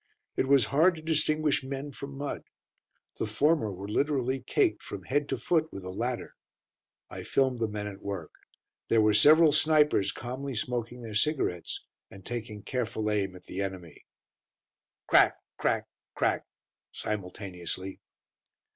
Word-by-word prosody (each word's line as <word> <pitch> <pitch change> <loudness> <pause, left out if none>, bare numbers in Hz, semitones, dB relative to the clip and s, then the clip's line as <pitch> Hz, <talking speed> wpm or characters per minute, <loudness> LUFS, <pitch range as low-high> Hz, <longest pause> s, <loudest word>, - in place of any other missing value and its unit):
It - - +1
was 135 -4 +5
hard 165 +5 +5
to 160 - -9
distinguish 155 -2 +2
men 135 +2 -5
from 140 0 -8
mud. 140 0 -4 0.7
The - - 0
former 140 +1 +2
were 95 +1 -7
literally 130 +2 +1
caked - - +1
from - - -7
head 145 +2 0
to 135 - 0
foot 160 +5 +1
with 95 - -7
the 95 - -5
latter. 120 +4 -3 0.8
I - - -6
filmed 130 -3 +1
the 115 - +1
men 105 -1 -4
at 100 -1 -7
work. 100 -6 -5 0.6
There 115 - +4
were 105 -1 +5
several 155 +9 +7
snipers 150 -9 +4
calmly 130 +3 -5
smoking 120 +1 -3
their 110 -2 -7
cigarettes 105 - -1 0.2
and 95 -1 -13
taking 110 -3 -5
careful 110 -4 -2
aim 100 -3 0
at 90 - -12
the 95 - -5
enemy. 95 -5 -6 1.0
Crack - - +5 0.2
crack - - +1 0.3
crack - - 0 0.4
simultaneously. 95 -2 -5
120 Hz, 145 wpm, -29 LUFS, 100-140 Hz, 1.0 s, several